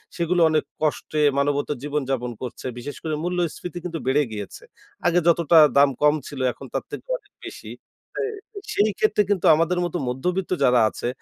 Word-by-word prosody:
সেগুলো 175 +1 +1
অনেক 155 -1 +1 0.2
কষ্টে 155 0 -1 0.2
মানবেতর 145 +1 0
জীবনযাপন 135 -4 -2
করছে। 125 -2 -7
বিশেষ 145 +4 -7
করে 155 -1 -2
মূল্যস্ফীতি 175 0 -3
কিন্তু 165 -2 -4
বেড়ে 140 +3 +3
গিয়েছে। 105 -2 -7 0.4
আগে 175 0 +4
যতটা 170 -1 +4 0.2
দাম 140 0 +6
কম 150 0 +5
ছিল, 145 - -8
এখন - - -11
তার - - -1
থেকে - - -7
অনেক - - -30
বেশি। - - -9 0.5
সে - - 0 0.5
সেই 210 +1 +3
ক্ষেত্রে 215 -1 +3
কিন্তু 200 -4 +1
আমাদের 165 +3 +1
মতো 175 +1 -3
মধ্যবিত্ত 180 +9 -2
যারা 125 -2 +5
আছে, - - -5
155 Hz, 165 wpm, -23 LUFS, 140-175 Hz, 0.5 s, দাম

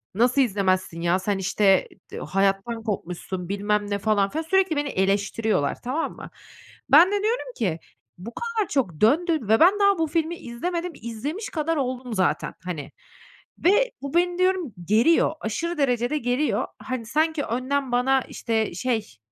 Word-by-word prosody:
"Nasıl 245 +5 +3
izlemezsin, 185 -7 0
ya? 175 +2 +2
Sen 195 +1 -1
işte, 190 0 +2 0.3
eee, - - -5
hayattan 195 +6 0
kopmuşsun." 180 -3 -4
bilmem 205 +1 0
ne 200 - 0
falan 205 -1 +2
filan, 320 +2 -2
sürekli 375 0 +2
beni 290 -1 -1
eleştiriyorlar, 200 - 0
tamam 265 +7 -2
mı? - - -10 0.6
Ben 310 +6 +8
de 410 0 0
diyorum 485 +3 -1
ki, 175 -7 -1 0.4
"Bu 220 +7 -9
kadar 460 -4 -2
çok 185 - -1
döndü 320 +8 +3
ve 220 0 +2
ben 380 +5 +6
daha 400 -1 +4
bu 320 - +1
filmi 330 +2 -1
izlemedim, 340 +9 -4
izlemiş 275 - -5
kadar 325 0 -1
oldum 255 -3 -3
zaten, 190 -3 0
hani." 165 -6 -5 0.7
ve 460 +7 +3
"Bu 280 - -5
beni" 350 +1 +2
diyorum 370 - +1
"g 210 - +1
geriyor, 310 +11 +4
aşırı 335 +11 -3
derecede 245 +1 +1
geriyor." 250 +4 0
Hani, 255 -3 -4
sanki 310 +4 0
önden 260 +3 -2
bana, 260 +2 +3
işte, 225 -4 -2
şey 220 - -2
245 Hz, 160 wpm, -24 LUFS, 205-325 Hz, 0.7 s, Ben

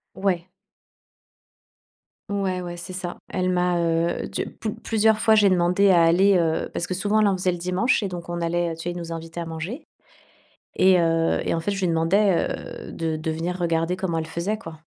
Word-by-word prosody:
Ouais. 185 -2 -1 1.8
Ouais, 190 -2 -1
ouais, 175 0 -6
c'est 185 +2 -8
ça. 180 -1 -5
Elle 185 -1 -1
m'a, 180 -1 +1
heu, 170 0 0
tu - - -3
plus 215 - -5
plusieurs 220 -1 +2
fois, 220 - +4
j'ai 210 -2 +5
demandé 180 +2 +3
à 170 -2 +6
aller 190 +4 +5
heu, 160 -1 0
parce 175 - -3
que 185 - -3
souvent, 205 +3 +1
elle 210 - +4
en 195 - +2
faisait 185 0 0
le 175 - -4
dimanche 185 +7 +1
et - - 0
donc 175 -2 -7
on 175 0 -3
allait, 170 0 0
heu, - - -7
tu 165 - -9
sais, 175 - -2
ils 175 - -6
nous 170 -1 -6
invitaient 165 +1 -6
à 170 - -4
manger. 165 - -6 0.9
Et 185 -1 +5
heu, 165 -1 +2
et - - 0
en - - -1
fait, 205 +5 -2
je 195 - -3
lui 185 - +1
demandais, 170 +4 +2
heu, - - -7
de 160 -1 -2
de 160 +1 -3
venir 170 +3 -3
regarder 165 0 0
comment 175 -3 -2
elle 160 - -5
faisait 175 +7 -2
quoi, 165 -5 -9
175 Hz, 215 wpm, -24 LUFS, 165-190 Hz, 1.8 s, à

